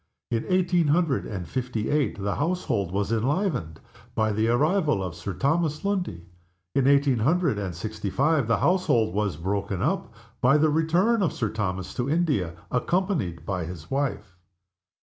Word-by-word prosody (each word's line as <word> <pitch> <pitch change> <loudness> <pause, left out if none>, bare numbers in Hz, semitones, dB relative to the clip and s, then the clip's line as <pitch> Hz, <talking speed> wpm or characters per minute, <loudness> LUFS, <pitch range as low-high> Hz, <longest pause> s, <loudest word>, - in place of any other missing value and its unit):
In 115 -1 0
eighteen 180 -3 +2
hundred 150 -2 +1
and 90 -5 -5
fifty 120 - -2
eight 145 -8 0
the 100 0 -2
household 145 - -1
was 100 +2 -1
enlivened 125 - -1 0.4
by 110 -1 +2
the 110 +2 +1
arrival 150 - +2
of 90 -3 -4
Sir 90 +3 -5
Thomas 155 - 0
Lundie. 180 - -2 0.5
In 135 -1 +2
eighteen 140 -3 +4
hundred 155 - +2
and 95 -4 -4
sixty 105 +3 -4
five 140 - +2
the 115 - +3
household 120 - +2
was 100 -6 -1
broken 100 +2 -2
up - - -1 0.3
by 130 +4 +5
the 155 0 +3
return 175 +9 +2
of 180 - +2
Sir 115 -4 -1
Thomas 95 -4 -3
to 125 +2 -2
India, 145 - 0 0.2
accompanied 125 - -1
by 90 -3 -2
his 85 -2 -9
wife. 135 -9 -2
120 Hz, 160 wpm, -26 LUFS, 100-160 Hz, 0.5 s, by